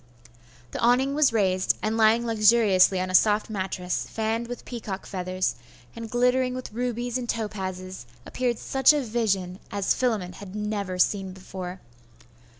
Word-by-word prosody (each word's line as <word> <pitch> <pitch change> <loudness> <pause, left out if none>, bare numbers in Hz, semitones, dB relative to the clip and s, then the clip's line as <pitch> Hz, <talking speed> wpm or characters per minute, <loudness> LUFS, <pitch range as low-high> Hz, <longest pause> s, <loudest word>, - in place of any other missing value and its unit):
The - - -5
awning 250 +4 +3
was 295 -3 +4
raised, 190 -4 +1
and 215 +1 0
lying 225 +1 +4
luxuriously 215 -4 +4
on 185 0 -2
a - - -6
soft 210 +3 +3
mattress, 190 -3 -3
fanned 225 +1 -2
with 245 0 -7
peacock's 215 -5 -6
feathers, 185 0 -1 0.4
and 230 -1 -7
glittering 250 +2 +2
with 255 -4 -7
rubies 245 +1 -2
and 240 -2 -6
topazes, 185 - -4 0.2
appeared 245 -2 -1
such 265 +4 +4
a 295 - +1
vision 205 -6 -1
as 200 -1 +1
Philammon 215 -8 -1
had 195 +1 -10
never 210 -3 -3
seen 190 0 +1
before. 185 -1 -8
215 Hz, 150 wpm, -25 LUFS, 185-240 Hz, 0.4 s, was